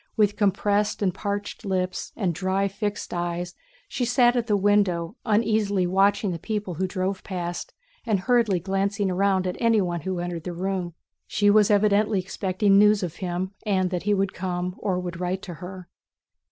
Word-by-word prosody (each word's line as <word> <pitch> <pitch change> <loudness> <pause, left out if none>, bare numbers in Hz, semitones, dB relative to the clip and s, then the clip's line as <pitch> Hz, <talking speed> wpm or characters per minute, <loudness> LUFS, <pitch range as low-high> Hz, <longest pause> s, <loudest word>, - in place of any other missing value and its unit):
With 205 -1 +3
compressed 205 +1 +1
and 185 -2 +1
parched 205 +3 -4
lips 185 -2 -2
and 190 -6 0
dry 190 +4 0
fixed 205 +1 -4
eyes, 175 0 -3 0.3
she 250 - -3
sat 245 0 +4
at 235 -2 0
the 210 -2 +3
window, 200 -2 +2
uneasily 210 -3 +2
watching 195 +2 +2
the 170 - -4
people 205 0 -3
who 185 +4 -1
drove 185 +1 -2
past 175 -2 -4 0.3
and 210 -5 0
hurriedly 230 -5 +2
glancing 195 +2 -1
round 190 0 +2
at 180 - -2
anyone 200 -8 +2
who 185 +3 -3
entered 175 -2 -4
the 180 - -4
room. 180 -1 -3 0.3
She 205 -1 +3
was 210 -1 +5
evidently 210 0 +3
expecting 195 +2 +2
news 210 -1 +5
of 175 -2 -4
him 185 0 -3
and 190 -3 +1
that 180 -2 -1
he 205 0 +1
would 195 0 0
come 180 0 -3
or 190 -3 -1
would 175 -1 -5
write 185 +2 -2
to 180 - -6
her. 185 0 -8
195 Hz, 175 wpm, -25 LUFS, 180-205 Hz, 0.3 s, was